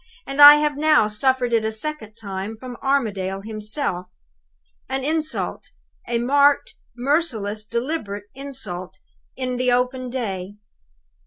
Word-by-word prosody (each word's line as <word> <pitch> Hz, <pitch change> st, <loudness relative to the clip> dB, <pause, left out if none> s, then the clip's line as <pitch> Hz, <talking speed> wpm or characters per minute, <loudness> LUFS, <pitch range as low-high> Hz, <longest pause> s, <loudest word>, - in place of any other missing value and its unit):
And 275 Hz, +1 st, -1 dB
I 290 Hz, 0 st, +12 dB
have 295 Hz, -1 st, 0 dB
now 305 Hz, -6 st, +4 dB
suffered 245 Hz, +3 st, 0 dB
it 225 Hz, -1 st, +3 dB
a 220 Hz, -, -1 dB
second 220 Hz, -2 st, -5 dB
time 200 Hz, 0 st, -6 dB
from 250 Hz, +1 st, -8 dB
Armadale 205 Hz, -8 st, -1 dB
himself. 215 Hz, -3 st, -2 dB, 0.8 s
An 265 Hz, 0 st, -2 dB
insult 315 Hz, +2 st, -2 dB, 0.4 s
a 240 Hz, -, 0 dB
marked, 280 Hz, +4 st, +3 dB, 0.2 s
merciless, 240 Hz, -7 st, -1 dB
deliberate 225 Hz, -3 st, -4 dB
insult 210 Hz, -10 st, -6 dB, 0.4 s
in 255 Hz, -1 st, -3 dB
the 250 Hz, 0 st, +1 dB
open 250 Hz, +1 st, 0 dB
day! 205 Hz, -6 st, -4 dB
245 Hz, 120 wpm, -22 LUFS, 210-280 Hz, 0.8 s, I